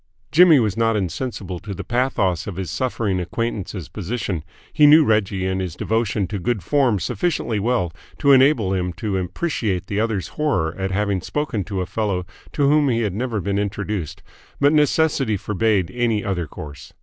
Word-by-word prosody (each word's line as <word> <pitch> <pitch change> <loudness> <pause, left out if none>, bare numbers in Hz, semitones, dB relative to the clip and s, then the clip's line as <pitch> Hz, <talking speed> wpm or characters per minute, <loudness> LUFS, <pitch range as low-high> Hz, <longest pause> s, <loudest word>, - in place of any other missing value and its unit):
Jimmy 165 -2 +7
was 105 -4 0
not 115 0 +2
insensible 95 -1 -3
to 100 +1 -7
the - - -6
pathos 120 -8 0
of 100 - -5
his 95 -1 -4
suffering 110 -7 -1
acquaintance's 95 -1 -3
position; 100 -5 -4 0.3
he 150 -1 +6
knew 155 +1 +7
Reggie 100 -4 +1
and 95 0 -1
his 90 -3 -4
devotion 110 -2 0
to 105 - -3
good 105 +1 -1
form 130 - +2
sufficiently 115 - -1
well 105 -6 0 0.2
to 140 - +3
enable 130 -7 +4
him 90 -1 -1
to 100 +4 -3
appreciate 95 - -2
the 100 +1 -2
other's 110 -4 -1
horror 140 - 0
at 95 0 -2
having 100 -1 0
spoken 135 - -2
to 95 -2 -3
a - - -2
fellow 95 -3 -2 0.3
to 145 -2 +2
whom 145 -1 +4
he 115 -2 +1
had 105 -5 -1
never 115 +1 -2
been 100 +1 -1
introduced; 100 -6 -3 0.4
but 145 +2 +4
necessity 150 -6 +2
forbade 100 -3 0
any 115 -4 0
other 90 -5 -2
course. 75 0 -10
105 Hz, 175 wpm, -21 LUFS, 95-125 Hz, 0.4 s, Jimmy